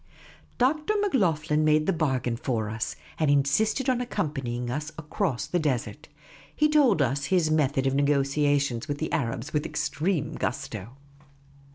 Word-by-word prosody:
Dr. 305 Hz, +10 st, +1 dB
Macloghlen 165 Hz, -, +1 dB
made 155 Hz, 0 st, +3 dB
the 195 Hz, -, +2 dB
bargain 130 Hz, -7 st, 0 dB
for 115 Hz, -3 st, -2 dB
us, 110 Hz, 0 st, -3 dB, 0.2 s
and 155 Hz, -2 st, +2 dB
insisted 145 Hz, -, +2 dB
on 255 Hz, -2 st, +2 dB
accompanying 135 Hz, -, -3 dB
us 150 Hz, +4 st, -4 dB
across 160 Hz, -2 st, -2 dB
the 180 Hz, -, -1 dB
desert. 135 Hz, -7 st, -2 dB, 0.5 s
He 300 Hz, -, +3 dB
told 270 Hz, -, +4 dB
us 140 Hz, +1 st, -1 dB
his 170 Hz, -2 st, +2 dB
method 140 Hz, -3 st, +1 dB
of 135 Hz, -, +2 dB
negotiation 140 Hz, -2 st, +1 dB
with 145 Hz, -1 st, -2 dB
the 160 Hz, -, -3 dB
Arabs 115 Hz, +5 st, -2 dB
with 150 Hz, -1 st, +1 dB
extreme 155 Hz, 0 st, -1 dB
gusto. 120 Hz, -3 st, -4 dB
150 Hz, 145 wpm, -26 LUFS, 135-175 Hz, 0.5 s, told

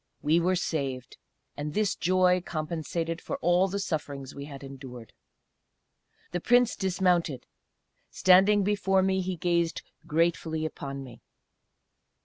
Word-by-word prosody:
We 155 Hz, +3 st, +4 dB
were 180 Hz, +2 st, +2 dB
saved. 135 Hz, -7 st, -3 dB, 0.4 s
And 150 Hz, +1 st, -5 dB
this 210 Hz, -2 st, +2 dB
joy 180 Hz, 0 st, +3 dB
compensated 165 Hz, +1 st, -3 dB
for -, -, -4 dB
all 175 Hz, +3 st, +3 dB
the 195 Hz, +1 st, -3 dB
sufferings 145 Hz, -7 st, -4 dB
we 140 Hz, 0 st, -7 dB
had 140 Hz, -2 st, -10 dB
endured. 130 Hz, -4 st, -10 dB, 1.2 s
The 175 Hz, -, -1 dB
Prince 245 Hz, +2 st, +4 dB
dismounted; 180 Hz, -7 st, 0 dB, 0.6 s
standing 195 Hz, +3 st, +5 dB
before 195 Hz, -1 st, +2 dB
me, 190 Hz, 0 st, +1 dB
he 185 Hz, 0 st, -3 dB
gazed 170 Hz, 0 st, 0 dB, 0.2 s
gratefully 160 Hz, 0 st, 0 dB
upon 140 Hz, -3 st, -5 dB
me. 125 Hz, -3 st, -12 dB
170 Hz, 125 wpm, -28 LUFS, 145-185 Hz, 1.2 s, standing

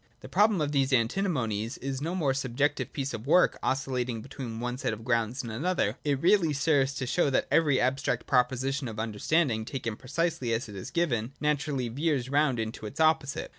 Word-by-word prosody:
The -, -, -9 dB
problem 210 Hz, -4 st, +3 dB
of 145 Hz, -1 st, 0 dB
these 135 Hz, -1 st, +1 dB
Antinomies 120 Hz, -, 0 dB
is 135 Hz, 0 st, -4 dB
no 165 Hz, +4 st, -2 dB
mere 145 Hz, -7 st, +1 dB
subjective 135 Hz, +2 st, -1 dB
piece 140 Hz, -1 st, -3 dB
of 110 Hz, +4 st, -6 dB
work 180 Hz, +4 st, +4 dB
oscillating 125 Hz, -4 st, -1 dB
between 130 Hz, -5 st, -7 dB
one 125 Hz, +1 st, -3 dB
set -, -, -1 dB
of 110 Hz, +1 st, -8 dB
grounds 115 Hz, +1 st, 0 dB
and 115 Hz, -, -6 dB
another: 135 Hz, -, 0 dB
it 145 Hz, -3 st, 0 dB
really 175 Hz, -1 st, +3 dB
serves 140 Hz, -2 st, +2 dB
to 130 Hz, -, -3 dB
show 145 Hz, +4 st, +1 dB
that 135 Hz, -, +1 dB
every 145 Hz, -3 st, +4 dB
abstract 130 Hz, -2 st, 0 dB
proposition 130 Hz, +1 st, +1 dB
of 110 Hz, -2 st, -6 dB
understanding, 110 Hz, +3 st, 0 dB
taken 115 Hz, -2 st, -4 dB
precisely 135 Hz, -1 st, -1 dB
as 115 Hz, +1 st, -1 dB
it 105 Hz, -, -10 dB
is 95 Hz, -, -6 dB
given, 130 Hz, -8 st, -1 dB
naturally 150 Hz, -3 st, 0 dB
veers 135 Hz, 0 st, -1 dB
round 140 Hz, -2 st, +2 dB
into 110 Hz, -1 st, -4 dB
its 135 Hz, -, -10 dB
opposite. 155 Hz, -3 st, +2 dB
135 Hz, 190 wpm, -28 LUFS, 120-150 Hz, -, work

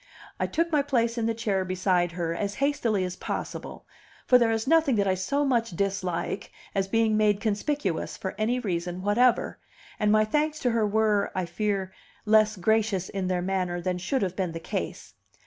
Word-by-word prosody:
I -, -, 0 dB
took 335 Hz, +1 st, 0 dB
my 300 Hz, -2 st, +3 dB
place 235 Hz, -4 st, 0 dB
in 230 Hz, -2 st, -1 dB
the 230 Hz, -, 0 dB
chair 205 Hz, -4 st, 0 dB
beside 185 Hz, -1 st, 0 dB
her 165 Hz, -1 st, -2 dB
as 200 Hz, +3 st, -3 dB
hastily 245 Hz, -8 st, +1 dB
as 180 Hz, 0 st, -3 dB
possible, -, -, -5 dB, 0.4 s
for 250 Hz, -, +6 dB
there 235 Hz, -2 st, +3 dB
is 225 Hz, 0 st, 0 dB
nothing 320 Hz, -3 st, +4 dB
that 200 Hz, -2 st, +1 dB
I 190 Hz, -, +3 dB
so 235 Hz, +11 st, 0 dB
much 230 Hz, -7 st, 0 dB
dislike 195 Hz, -1 st, -2 dB, 0.2 s
as 195 Hz, -1 st, 0 dB
being 225 Hz, +1 st, +2 dB
made 210 Hz, -2 st, +3 dB
conspicuous 210 Hz, -, -2 dB
for 190 Hz, -, -4 dB
any 220 Hz, +4 st, 0 dB
reason 180 Hz, -4 st, -3 dB
whatever; 235 Hz, +5 st, +2 dB, 0.4 s
and 210 Hz, -1 st, +3 dB
my 215 Hz, 0 st, +4 dB
thanks 300 Hz, +7 st, 0 dB
to 245 Hz, -, +2 dB
her 225 Hz, -2 st, +2 dB
were, 210 Hz, -1 st, +2 dB
I 185 Hz, -1 st, 0 dB
fear, 190 Hz, +1 st, -2 dB, 0.3 s
less 215 Hz, 0 st, +4 dB
gracious 205 Hz, -1 st, +1 dB
in 195 Hz, -2 st, -3 dB
their 180 Hz, -1 st, 0 dB
manner 180 Hz, -2 st, -1 dB
than 180 Hz, 0 st, -2 dB
should 255 Hz, +7 st, -1 dB
have 185 Hz, -1 st, -2 dB
been 185 Hz, -4 st, -2 dB
the 165 Hz, -, -5 dB
case. -, -, -5 dB
210 Hz, 190 wpm, -27 LUFS, 185-230 Hz, 0.4 s, for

